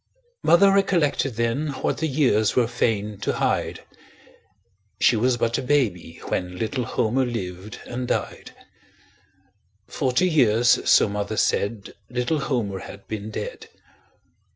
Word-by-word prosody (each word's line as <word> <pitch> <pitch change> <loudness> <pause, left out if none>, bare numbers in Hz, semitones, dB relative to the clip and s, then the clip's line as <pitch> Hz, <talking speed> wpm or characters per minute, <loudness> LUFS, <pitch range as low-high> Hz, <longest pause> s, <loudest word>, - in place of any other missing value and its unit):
Mother 195 +3 +5
recollected 170 - +1
then 115 +6 -1
What - - 0
the 160 - 0
years 125 -8 +2
were 125 - +4
fain 105 -3 -1
to 100 - -1
hide - - -1 1.2
She - - +4
was 120 +2 +1
but 115 0 0
a - - -2
baby 115 - -1
when 90 0 -3
Little 115 +4 -2
Homer 120 +4 0
lived 100 -5 -5
and 125 0 -5
died; - - -3 1.4
Forty 130 - 0
years, 120 -7 +3
so - - +6
mother 105 +1 -3
said, 100 +1 -1 0.2
Little 125 +5 -1
Homer 120 -9 -2
had 100 - -11
been 110 0 -5
dead. 110 - -6
120 Hz, 130 wpm, -23 LUFS, 105-135 Hz, 1.4 s, so